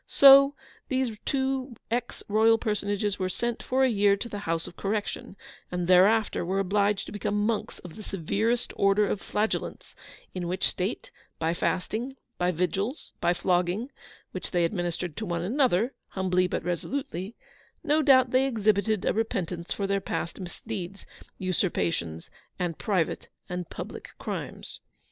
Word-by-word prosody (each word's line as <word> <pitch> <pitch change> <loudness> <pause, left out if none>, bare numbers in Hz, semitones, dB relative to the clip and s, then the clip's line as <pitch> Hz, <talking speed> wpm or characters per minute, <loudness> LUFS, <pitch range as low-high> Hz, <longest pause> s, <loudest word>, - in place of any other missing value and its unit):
So 275 +1 +8 0.3
these 260 -4 0
two 265 -2 -1 0.2
Ex 240 +1 -2
Royal 220 +2 +5
personages 205 -2 -1
were 185 -1 0
sent 235 +5 -2
for 260 +1 +1
a - - +6
year 200 -4 +3
to 235 - -5
the 205 -3 -5
House 165 0 0
of - - -10
Correction, 205 -1 -3 0.4
and 180 -1 -1
thereafter 200 +5 +5
were 185 +3 -1
obliged 200 +1 +1
to - - -9
become 205 0 -1
monks 220 -1 -1
of 175 -3 -11
the 215 - -8
severest 215 +6 -1
Order 200 +1 +4
of 200 0 -2
Flagellants, 215 +1 -2 0.4
in 180 -2 -3
which 185 +2 0
state, 190 +5 -3 0.3
by 165 +1 0
fasting, 220 +9 -1 0.2
by 180 0 +2
vigils, 185 - -2
by 175 - +3
flogging 180 +8 0 0.4
(which 185 - -5
they 175 -1 +2
administered 175 -2 -2
to 220 - -3
one 170 -1 -1
another, 240 +1 +2
humbly 185 -1 +1
but - - -2
resolutely), 190 - -3 0.5
no 310 0 +3
doubt 260 -4 +5
they 260 +1 +4
exhibited 215 -3 +1
a - - +2
repentance 180 -6 -2
for 200 - -1
their 195 0 0
past 170 -1 -3
misdeeds, 195 +1 -6 0.3
usurpations, 85 - -1 0.3
and 175 -3 -2
private 190 -7 0 0.2
and 180 -2 -4
public - - -7
crimes. - - -6
200 Hz, 150 wpm, -27 LUFS, 180-225 Hz, 0.5 s, So